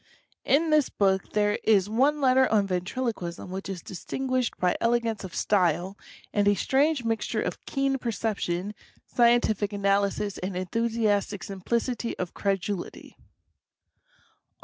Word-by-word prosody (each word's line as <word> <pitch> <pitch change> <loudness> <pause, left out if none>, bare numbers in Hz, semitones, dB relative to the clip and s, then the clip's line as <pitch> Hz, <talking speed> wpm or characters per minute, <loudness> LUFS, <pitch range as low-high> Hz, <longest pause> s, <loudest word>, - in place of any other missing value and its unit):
In 315 +3 +3
this 305 -3 +4
book 190 -1 0
there 210 0 +1
is 200 -3 +4
one 270 +8 +2
letter 260 0 +4
on 210 -2 +3
Ventriloquism 185 -1 -3
which 195 +1 -5
is 185 -3 -5
distinguished 255 +7 -2
by 180 -1 +1
elegance 230 -2 +1
of 185 - -8
style 180 -1 +1 0.4
and 205 -1 +2
a 205 - +5
strange 275 - +1
mixture 225 -1 -1
of - - -5
keen 275 -1 0
perception, 210 -5 -2 0.3
scientific 235 -4 +2
analysis 200 0 0
and 185 0 -4
enthusiastic 210 +1 0
simplicity 230 +5 -2
of 180 -1 -4
cred 195 -2 0
ulity. 195 -3 -6
210 Hz, 125 wpm, -27 LUFS, 195-240 Hz, 0.4 s, a